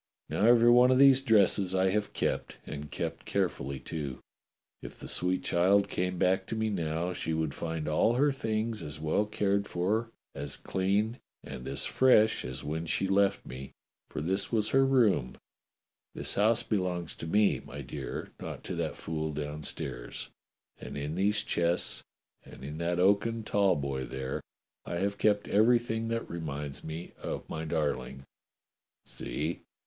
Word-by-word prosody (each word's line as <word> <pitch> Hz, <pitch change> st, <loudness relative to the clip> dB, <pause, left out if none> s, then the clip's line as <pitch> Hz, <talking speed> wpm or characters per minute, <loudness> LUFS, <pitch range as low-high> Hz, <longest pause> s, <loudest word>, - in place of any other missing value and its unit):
Now -, -, -1 dB
every 120 Hz, 0 st, +7 dB
one 125 Hz, +1 st, +7 dB
of 130 Hz, -, +4 dB
these 135 Hz, -1 st, +7 dB
dresses 100 Hz, -6 st, +3 dB
I 95 Hz, 0 st, +3 dB
have 105 Hz, +1 st, -1 dB
kept, -, -, -2 dB
and 75 Hz, 0 st, -6 dB
kept -, -, -4 dB
carefully, 70 Hz, 0 st, -2 dB
too. 70 Hz, -5 st, -5 dB, 0.6 s
If -, -, -9 dB
the -, -, -9 dB
sweet 90 Hz, +1 st, 0 dB
child 100 Hz, +3 st, +3 dB
came 90 Hz, 0 st, -1 dB
back 95 Hz, +2 st, +2 dB
to -, -, -3 dB
me 110 Hz, -1 st, 0 dB
now, 85 Hz, -1 st, -1 dB
she 80 Hz, -2 st, -2 dB
would 80 Hz, -3 st, -1 dB
find 80 Hz, -2 st, -4 dB
all 80 Hz, +10 st, +3 dB
her 145 Hz, +3 st, +3 dB
things 110 Hz, -3 st, -2 dB
as 75 Hz, 0 st, -6 dB
well 80 Hz, +7 st, +1 dB
cared 100 Hz, -1 st, 0 dB
for, 105 Hz, +6 st, 0 dB, 0.2 s
as 70 Hz, 0 st, -4 dB
clean, 100 Hz, +5 st, 0 dB, 0.2 s
and 65 Hz, -, -8 dB
as 70 Hz, +1 st, 0 dB
fresh 110 Hz, -4 st, +4 dB
as 65 Hz, +1 st, -5 dB
when 80 Hz, +3 st, -3 dB
she 95 Hz, -, +1 dB
left 100 Hz, +1 st, +2 dB
me, 65 Hz, +1 st, -8 dB, 0.4 s
for -, -, -4 dB
this 95 Hz, +5 st, 0 dB
was 110 Hz, -2 st, +2 dB
her 135 Hz, 0 st, +5 dB
room 105 Hz, -, +3 dB, 0.8 s
(this -, -, +1 dB
house 110 Hz, +3 st, +3 dB
belongs 90 Hz, -5 st, -1 dB
to 80 Hz, -, -6 dB
me, 105 Hz, +4 st, +3 dB
my 70 Hz, +1 st, -8 dB
dear, 65 Hz, -, -6 dB
not -, -, -7 dB
to -, -, -4 dB
that -, -, -2 dB
fool 80 Hz, -1 st, -3 dB
downstairs), 75 Hz, -4 st, -4 dB, 0.5 s
and -, -, -7 dB
in 75 Hz, +2 st, -3 dB
these 100 Hz, +4 st, +2 dB
chests 85 Hz, +1 st, +1 dB, 0.4 s
and -, -, -13 dB
in 75 Hz, +3 st, -6 dB
that 85 Hz, +1 st, 0 dB
oaken 100 Hz, +5 st, +2 dB
tall 100 Hz, -2 st, +3 dB
boy 70 Hz, -2 st, -2 dB
there 65 Hz, +1 st, -4 dB, 0.4 s
I -, -, -5 dB
have 100 Hz, +3 st, -1 dB
kept 105 Hz, -1 st, +2 dB
everything 115 Hz, +1 st, +3 dB
that 115 Hz, 0 st, -2 dB
reminds 75 Hz, -4 st, -5 dB
me 80 Hz, +2 st, -6 dB
of -, -, -5 dB
my 80 Hz, 0 st, -4 dB
darling. 65 Hz, -4 st, -2 dB, 0.8 s
See!" 80 Hz, +3 st, -4 dB
90 Hz, 165 wpm, -30 LUFS, 75-105 Hz, 0.8 s, every